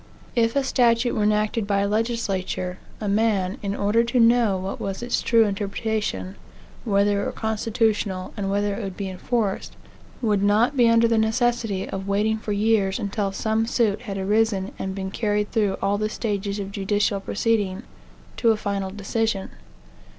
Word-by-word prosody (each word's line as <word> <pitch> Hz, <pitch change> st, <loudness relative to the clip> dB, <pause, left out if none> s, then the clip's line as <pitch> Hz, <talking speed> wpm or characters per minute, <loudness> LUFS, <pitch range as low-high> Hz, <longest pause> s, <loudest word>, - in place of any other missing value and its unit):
If 230 Hz, 0 st, +2 dB
a 280 Hz, -, +2 dB
statute 240 Hz, -2 st, +2 dB
were -, -, 0 dB
enacted 210 Hz, 0 st, +1 dB
by 200 Hz, -1 st, +2 dB
a 200 Hz, -, +1 dB
legislature, 200 Hz, -5 st, -2 dB, 0.2 s
a 210 Hz, -, -3 dB
man, 205 Hz, 0 st, +1 dB
in 200 Hz, 0 st, -2 dB
order 210 Hz, +3 st, +2 dB
to 240 Hz, +2 st, +1 dB
know 230 Hz, -4 st, +4 dB
what 190 Hz, +1 st, -5 dB
was 195 Hz, +3 st, -4 dB
its 240 Hz, -, 0 dB
true 230 Hz, -1 st, +4 dB
interpretation, 200 Hz, -, -2 dB, 0.5 s
whether 200 Hz, -1 st, +2 dB
it -, -, -2 dB
were -, -, -2 dB
constitutional, 220 Hz, -3 st, -1 dB
and 195 Hz, -1 st, -2 dB
whether 205 Hz, +1 st, 0 dB
it 215 Hz, -, -4 dB
would 190 Hz, -2 st, -6 dB
be 195 Hz, -2 st, -3 dB
enforced, 205 Hz, +1 st, -2 dB, 0.4 s
would 210 Hz, -5 st, +1 dB
not 210 Hz, +7 st, +3 dB
be 240 Hz, -3 st, +5 dB
under 230 Hz, 0 st, +5 dB
the 230 Hz, -1 st, +2 dB
necessity 225 Hz, -3 st, 0 dB
of 195 Hz, 0 st, -5 dB
waiting 215 Hz, +2 st, +1 dB
for 215 Hz, -, -5 dB
years 205 Hz, -2 st, +2 dB
until 200 Hz, -2 st, -2 dB
some 220 Hz, +3 st, 0 dB
suit 220 Hz, -4 st, +1 dB
had 195 Hz, -1 st, -5 dB
arisen 200 Hz, 0 st, +1 dB
and 190 Hz, 0 st, -3 dB
been 190 Hz, -1 st, -4 dB
carried 210 Hz, -1 st, -1 dB
through 210 Hz, -4 st, +1 dB
all 200 Hz, +1 st, +1 dB
the 215 Hz, 0 st, 0 dB
stages 205 Hz, -2 st, -2 dB
of 200 Hz, -1 st, -5 dB
judicial 200 Hz, 0 st, 0 dB
proceeding, 205 Hz, -1 st, -1 dB, 0.5 s
to 230 Hz, -, +3 dB
a 220 Hz, -, +4 dB
final 200 Hz, -2 st, -2 dB
decision. 205 Hz, +1 st, -2 dB
210 Hz, 170 wpm, -24 LUFS, 195-225 Hz, 0.5 s, be